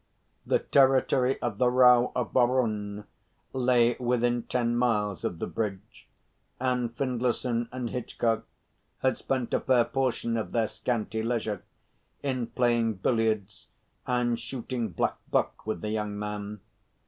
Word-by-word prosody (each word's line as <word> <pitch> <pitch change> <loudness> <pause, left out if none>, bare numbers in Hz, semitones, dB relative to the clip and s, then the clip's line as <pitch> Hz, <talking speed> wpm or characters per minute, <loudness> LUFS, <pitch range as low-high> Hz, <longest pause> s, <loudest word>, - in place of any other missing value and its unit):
The - - +4
territory 135 -1 +3
of 115 -4 -2
the 125 - +4
Rao 125 -1 +6
of 125 -3 -2
Baraon 110 -5 +1 0.5
lay 125 -2 +3
within 120 -1 +1
ten 120 0 0
miles 105 -6 +1
of 85 - -2
the - - -3
bridge; 100 -4 -5 0.5
and 125 -2 0
Findlayson 125 -2 -1
and 125 -2 -4
Hitchcock 115 -2 -1 0.6
had 130 -1 +3
spent 130 -3 -2
a - - +3
fair 125 -3 +3
portion 125 -4 -1
of 110 - -4
their 115 -2 +2
scanty 110 0 -2
leisure 110 -4 -2 0.6
in 130 -4 -1
playing 120 -3 +1
billiards 110 0 -1 0.4
and 120 -1 +1
shooting 120 -1 -4
blackbuck 85 - -1
with 110 - -2
the 105 - -3
young 105 -1 -2
man. 105 0 -5
120 Hz, 130 wpm, -28 LUFS, 110-125 Hz, 0.6 s, Rao